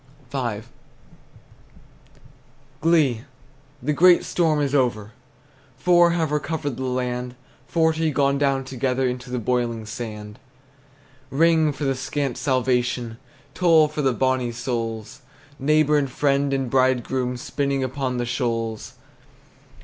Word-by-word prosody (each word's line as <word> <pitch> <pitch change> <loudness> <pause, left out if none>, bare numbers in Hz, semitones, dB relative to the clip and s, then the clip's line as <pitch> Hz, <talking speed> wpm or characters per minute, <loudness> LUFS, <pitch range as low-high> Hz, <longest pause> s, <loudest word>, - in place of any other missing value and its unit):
V. 120 -6 -2 2.2
Glee! 155 -8 +3 0.6
The 150 +3 0
great 175 +3 +6
storm 160 -4 +1
is 140 -1 -1
over! 120 -6 0 0.7
Four 175 +4 +5
have 165 -3 0
recovered 150 -3 -2
the 130 - -4
land; 125 -1 -3 0.3
Forty 160 -1 +1
gone 140 -1 +1
down 135 -2 +1
together 130 0 -1
Into 125 0 -5
the 125 - -2
boiling 120 -1 -1
sand. 105 0 -7 0.9
Ring, 160 +2 +3
for 145 - -6
the 135 -1 +1
scant 135 0 -3
salvation! 125 -3 0 0.3
Toll, 165 -2 +4
for 150 0 -4
the 135 -2 +2
bonnie 130 0 0
souls, 115 -1 -4 0.4
Neighbor 150 +1 +3
and 140 -2 -2
friend 140 +1 +1
and 135 -1 -1
bridegroom, 130 0 +1
Spinning 140 +2 -2
upon 130 -1 -2
the 120 - -1
shoals! 115 -3 -3
130 Hz, 120 wpm, -23 LUFS, 125-145 Hz, 2.2 s, great